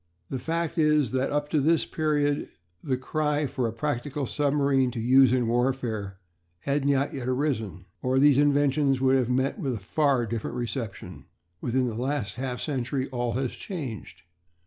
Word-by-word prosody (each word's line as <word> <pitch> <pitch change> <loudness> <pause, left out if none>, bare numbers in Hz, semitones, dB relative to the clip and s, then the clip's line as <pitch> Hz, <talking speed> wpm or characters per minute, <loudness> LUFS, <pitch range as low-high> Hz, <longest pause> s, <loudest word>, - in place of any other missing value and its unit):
The 130 - -2
fact 165 +3 -2
is 150 -6 +3
that 130 +1 0
up 145 0 0
to 150 -2 +2
this 160 +3 +3
period 145 -2 0 0.3
the 130 -2 0
cry 150 +2 -1
for 130 -3 -1
a - - -3
practical 140 +3 -2
submarine 140 -1 +1
to 120 -1 -5
use 130 +2 +5
in 125 -1 +2
warfare 120 -5 -1 0.4
had 140 0 -1
not 140 0 +1
yet 130 -3 -4
arisen, 125 - -1 0.2
or 130 +1 +1
these 140 0 +5
inventions 145 -1 +3
would 130 0 +3
have 125 -2 +1
met 130 - 0
with 135 -8 -1
a - - -5
far 135 +4 +1
different 115 0 -4
reception. 120 -3 -5 0.4
Within 125 +1 0
the 115 - -3
last 125 -3 -2
half 125 -1 -4
century 130 -2 -2
all 120 -2 -1
has 130 0 -1
changed. 140 - -7
135 Hz, 170 wpm, -26 LUFS, 120-145 Hz, 0.4 s, use